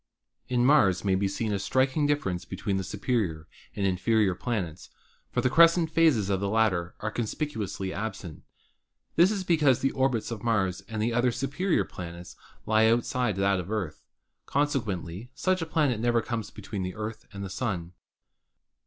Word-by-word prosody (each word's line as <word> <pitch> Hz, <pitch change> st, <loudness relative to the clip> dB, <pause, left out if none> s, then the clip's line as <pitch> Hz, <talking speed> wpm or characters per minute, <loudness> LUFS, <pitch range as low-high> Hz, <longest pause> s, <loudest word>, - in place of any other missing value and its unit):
In 125 Hz, -1 st, +2 dB
Mars 105 Hz, -, +4 dB
may 95 Hz, -, +3 dB
be 95 Hz, +1 st, +1 dB
seen 105 Hz, +2 st, -2 dB
a 100 Hz, -, -1 dB
striking 130 Hz, +7 st, +1 dB
difference 95 Hz, -12 st, -1 dB
between 95 Hz, +1 st, -3 dB
the 95 Hz, -, -2 dB
superior 95 Hz, -5 st, -2 dB, 0.3 s
and 100 Hz, -, -1 dB
inferior 95 Hz, +2 st, +2 dB
planets, 90 Hz, -6 st, -4 dB, 0.4 s
for -, -, 0 dB
the 130 Hz, -, +2 dB
crescent 165 Hz, +1 st, +5 dB
phases 155 Hz, -11 st, +3 dB
of 100 Hz, -2 st, 0 dB
the 100 Hz, 0 st, -1 dB
latter 100 Hz, -6 st, +1 dB
are 105 Hz, -, -2 dB
conspicuously 110 Hz, -, -3 dB
absent. 95 Hz, -6 st, -5 dB, 0.7 s
This 175 Hz, +3 st, +6 dB
is 205 Hz, -3 st, -2 dB
because 150 Hz, -8 st, +3 dB
the 135 Hz, -, +2 dB
orbits 130 Hz, -4 st, 0 dB
of 110 Hz, -3 st, -5 dB
Mars 95 Hz, -5 st, 0 dB
and 110 Hz, -1 st, -3 dB
the 115 Hz, +1 st, 0 dB
other 120 Hz, +1 st, +2 dB
superior 140 Hz, -, 0 dB
planets 85 Hz, -1 st, -9 dB, 0.3 s
lie 110 Hz, 0 st, +4 dB
outside 120 Hz, -2 st, +1 dB
of 95 Hz, -2 st, +1 dB
the -, -, -8 dB
Earth. 95 Hz, -8 st, -3 dB, 0.5 s
Consequently 110 Hz, -, -2 dB
such 185 Hz, -1 st, +1 dB
a 165 Hz, -, -3 dB
planet 145 Hz, -8 st, +1 dB
never 120 Hz, 0 st, +2 dB
comes 115 Hz, -4 st, -3 dB
between 105 Hz, -1 st, -6 dB
the 90 Hz, 0 st, -4 dB
Earth 110 Hz, +1 st, -6 dB
and 100 Hz, 0 st, -7 dB
the 95 Hz, -, -5 dB
Sun. 90 Hz, -6 st, -3 dB
110 Hz, 170 wpm, -27 LUFS, 95-130 Hz, 0.7 s, This